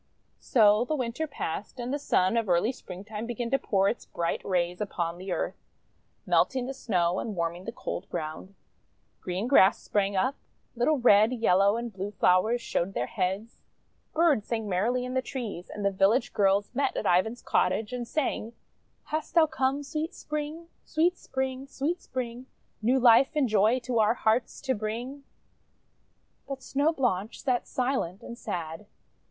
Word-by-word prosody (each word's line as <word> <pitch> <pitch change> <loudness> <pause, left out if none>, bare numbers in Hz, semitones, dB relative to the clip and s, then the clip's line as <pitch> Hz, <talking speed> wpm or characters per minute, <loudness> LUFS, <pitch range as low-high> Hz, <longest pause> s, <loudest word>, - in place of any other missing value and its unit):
So 215 -3 +4
the 305 +5 -1
Winter 255 +3 -2
passed 210 - -5
and 245 +2 -3
the 290 - -1
Sun 185 -7 +2
of 230 -4 0
early 175 +7 +3
Springtime 210 0 -8
began 240 0 -3
to 270 - +3
pour 195 -1 +2
its 235 - -1
bright 170 0 -2
rays 180 0 -1
upon 175 -4 -3
the 185 +1 -6
earth, - - -3 0.6
melting 260 -2 +2
the 270 - -4
Snow 185 -9 0
and 215 - -4
warming 170 +1 -2
the 230 - -4
cold 195 -4 -5
ground. 165 +4 -5 0.6
Green 185 +5 -3
grass 205 -7 +6
sprang 200 -1 0
up; 260 +9 +1 0.4
little 265 +6 +2
red, 220 -3 +5
yellow, 200 -3 +3
and 235 -1 -5
blue 195 +1 -4
flowers 210 +4 +2
showed 185 +3 -2
their - - 0
heads; 200 +2 -3 0.5
birds 310 -10 +2
sang 225 -2 -2
merrily 230 +7 0
in 250 - -5
the 260 - +1
trees, 230 -10 -6
and 205 - -5
the 200 - +3
village 200 +6 +2
girls 200 +1 +2
met 275 +2 0
at - - -2
Ivan's 220 +7 +2
cottage 215 +2 +1
and 245 -1 -4
sang: 240 -5 -2 0.2
— - - -43
"Hast 310 +2 -3
thou 330 -2 +7
come, 275 -1 -1
Sweet 310 +5 -4
Spring! 300 +2 -5 0.2
Sweet 340 +3 +1
Spring! 265 -3 -4
Sweet 305 +6 -2
Spring! 250 0 -5 0.3
New 250 +5 +3
life 245 +4 +6
and 290 -4 +3
joy 215 +2 +3
To 240 -1 -1
our 220 +2 +4
hearts 225 +1 0
to 265 -2 0
bring!" 240 +6 -5 1.2
But 270 -1 -6
Snow 285 +4 +1
Blanche 230 - -1
sat 250 -4 0
silent 250 -8 -2
and 235 - -7
sad. 170 -2 -5
230 Hz, 170 wpm, -28 LUFS, 195-265 Hz, 1.2 s, thou